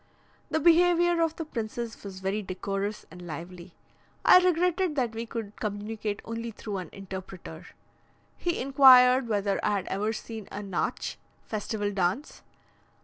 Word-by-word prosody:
The 315 Hz, -, +1 dB
behaviour 345 Hz, +1 st, +4 dB
of 325 Hz, -1 st, +1 dB
the 325 Hz, -, -5 dB
princes 230 Hz, -3 st, -5 dB
was 190 Hz, -2 st, -8 dB
very 195 Hz, +3 st, -1 dB
decorous 195 Hz, +2 st, -4 dB
and 180 Hz, +1 st, -11 dB
lively. 175 Hz, +2 st, -8 dB, 0.5 s
I 365 Hz, -, +9 dB
regretted 360 Hz, -1 st, +1 dB
that 245 Hz, -5 st, 0 dB
we 230 Hz, +1 st, -5 dB
could 220 Hz, -3 st, -6 dB
communicate 210 Hz, 0 st, -4 dB
only 230 Hz, +1 st, -4 dB
through 210 Hz, -2 st, -6 dB
an 185 Hz, -3 st, -6 dB
interpreter. 190 Hz, -4 st, -9 dB, 0.7 s
He 345 Hz, -1 st, -2 dB
inquired 255 Hz, -2 st, +7 dB
whether 200 Hz, -2 st, 0 dB
I 210 Hz, -, +2 dB
had 200 Hz, -2 st, -1 dB
ever 210 Hz, +3 st, -1 dB
seen 220 Hz, -1 st, -7 dB
a 205 Hz, -, -5 dB
Natsch 195 Hz, -3 st, -3 dB, 0.3 s
(festival 205 Hz, -1 st, -3 dB
dance). 195 Hz, -, -1 dB
215 Hz, 145 wpm, -28 LUFS, 195-270 Hz, 0.7 s, I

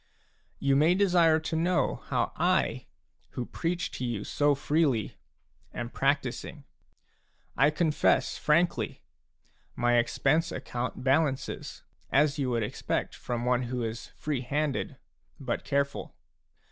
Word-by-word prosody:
You 140 Hz, 0 st, +2 dB
may 155 Hz, +5 st, +4 dB
desire 175 Hz, -5 st, +4 dB
to 160 Hz, -, -3 dB
know 175 Hz, +3 st, +1 dB
how -, -, 0 dB
I, -, -, +1 dB, 0.5 s
who 125 Hz, -, -3 dB
preach 175 Hz, +6 st, -2 dB
to -, -, -3 dB
you 115 Hz, -4 st, -2 dB
so 145 Hz, +4 st, +2 dB
freely, 140 Hz, -6 st, +1 dB, 0.6 s
am 120 Hz, 0 st, -4 dB
practising. 140 Hz, +1 st, -1 dB, 0.9 s
I 140 Hz, +2 st, +5 dB
confess 155 Hz, 0 st, +2 dB
frankly: 170 Hz, +3 st, +1 dB, 0.7 s
my 120 Hz, 0 st, +3 dB
expense 155 Hz, +7 st, +1 dB
account 125 Hz, -1 st, -4 dB
balances, 135 Hz, 0 st, 0 dB, 0.3 s
as 145 Hz, +1 st, +3 dB
you 135 Hz, -2 st, 0 dB
would 115 Hz, -2 st, 0 dB
expect 105 Hz, -, -2 dB
from 120 Hz, 0 st, -4 dB
one 125 Hz, 0 st, +2 dB
who 125 Hz, -1 st, -2 dB
is 115 Hz, +1 st, -4 dB
free 145 Hz, -5 st, -2 dB
handed 140 Hz, +1 st, -2 dB, 0.4 s
but 130 Hz, -4 st, -3 dB
careful. 140 Hz, 0 st, -1 dB
140 Hz, 120 wpm, -28 LUFS, 125-155 Hz, 0.9 s, I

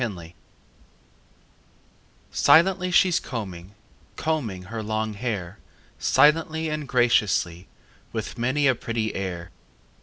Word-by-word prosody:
XXIV 90 Hz, -8 st, -5 dB, 2.0 s
Silently 180 Hz, +2 st, +4 dB
she's 180 Hz, -1 st, +4 dB
combing, 100 Hz, -5 st, -7 dB, 0.4 s
Combing 120 Hz, -13 st, -2 dB
her 110 Hz, +4 st, -6 dB
long 110 Hz, 0 st, -2 dB
hair 100 Hz, -4 st, -4 dB, 0.4 s
Silently 160 Hz, +1 st, +3 dB
and 155 Hz, -2 st, -4 dB
graciously, 105 Hz, -8 st, +1 dB, 0.4 s
With -, -, -5 dB
many 130 Hz, +5 st, 0 dB
a 135 Hz, -, +5 dB
pretty 115 Hz, -2 st, -3 dB
air. 90 Hz, -3 st, -5 dB
115 Hz, 95 wpm, -24 LUFS, 95-150 Hz, 2.0 s, a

